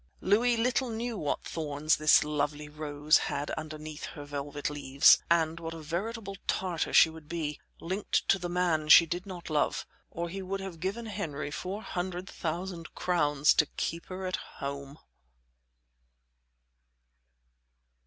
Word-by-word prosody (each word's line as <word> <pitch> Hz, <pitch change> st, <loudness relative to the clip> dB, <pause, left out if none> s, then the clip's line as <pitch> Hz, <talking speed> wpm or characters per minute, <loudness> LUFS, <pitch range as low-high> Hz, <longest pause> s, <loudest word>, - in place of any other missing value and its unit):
Louis 230 Hz, +5 st, +3 dB
little 250 Hz, +2 st, +1 dB
knew 230 Hz, +1 st, -3 dB
what 150 Hz, -8 st, -2 dB
thorns 155 Hz, -1 st, 0 dB
this 155 Hz, 0 st, +6 dB
lovely 150 Hz, 0 st, -2 dB
rose 150 Hz, 0 st, +2 dB
had 145 Hz, +1 st, -3 dB
underneath 155 Hz, 0 st, -6 dB
her 145 Hz, -2 st, -8 dB
velvet 145 Hz, 0 st, -4 dB
leaves, 140 Hz, -2 st, +5 dB
and 165 Hz, -1 st, +2 dB
what 165 Hz, 0 st, -5 dB
a -, -, -7 dB
veritable 195 Hz, +6 st, -4 dB
Tartar 180 Hz, -4 st, -1 dB
she 160 Hz, -, +7 dB
would 160 Hz, -2 st, -13 dB
be, 155 Hz, -3 st, -3 dB, 0.2 s
linked 190 Hz, +4 st, -1 dB
to 195 Hz, -, +5 dB
the 175 Hz, 0 st, -4 dB
man 170 Hz, -4 st, +1 dB
she 170 Hz, -, +10 dB
did 175 Hz, +4 st, -4 dB
not 175 Hz, -4 st, -7 dB
love; 150 Hz, -1 st, +1 dB, 0.2 s
or 170 Hz, +1 st, -4 dB
he 190 Hz, +3 st, -5 dB
would 195 Hz, +1 st, -3 dB
have 190 Hz, -4 st, -7 dB
given 200 Hz, +7 st, -3 dB
Henry 155 Hz, -9 st, -4 dB
four 195 Hz, +7 st, -5 dB
hundred 180 Hz, 0 st, -4 dB
thousand 170 Hz, +1 st, -5 dB
crowns 150 Hz, -5 st, +3 dB
to 150 Hz, -, +3 dB
keep 170 Hz, 0 st, -3 dB
her 185 Hz, 0 st, -5 dB
at 185 Hz, -, -1 dB
home. 140 Hz, +1 st, -7 dB
165 Hz, 145 wpm, -30 LUFS, 150-185 Hz, 0.2 s, she